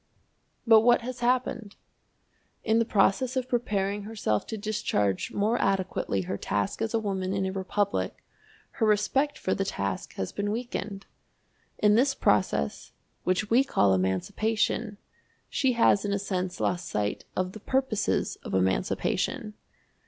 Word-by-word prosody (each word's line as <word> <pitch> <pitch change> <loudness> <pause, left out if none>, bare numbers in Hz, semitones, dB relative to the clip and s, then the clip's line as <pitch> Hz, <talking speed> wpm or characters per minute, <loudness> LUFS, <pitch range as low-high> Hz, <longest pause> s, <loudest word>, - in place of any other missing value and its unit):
But 225 -2 +8
what 240 +1 +4
has 250 +1 -6
happened? 240 -3 0 0.9
In 225 +1 +3
the 230 - +2
process 220 +5 +2
of 255 -1 -1
preparing 205 -5 -1
herself 205 - -2
to 220 - -4
discharge 200 - -1
more 215 +4 +1
adequately 190 - 0
her 95 +2 -4
task 100 - -2
as 225 0 -1
a - - +3
woman 190 -3 -2
in 195 -1 0
a 190 - -1
republic, 195 +1 -2 0.5
her 225 - 0
respect 265 +8 +2
for - - -1
the - - 0
task - - -3
has - - -3
been 205 0 -2
weakened. 210 -3 -4 0.7
In 210 0 +4
this 270 +5 +3
process, 70 -9 0 0.3
which 185 +4 0
we 250 +4 +6
call 100 - +3
emancipation, 205 - 0 0.5
she 265 -2 +2
has 230 -4 +4
in 205 -1 -1
a - - +1
sense 185 -2 -3
lost 180 0 -1
sight 105 -1 -2
of 185 0 -1
the 215 - -10
purposes 260 -2 0
of - - -4
emancipation. 95 - 0
205 Hz, 145 wpm, -27 LUFS, 185-230 Hz, 0.9 s, But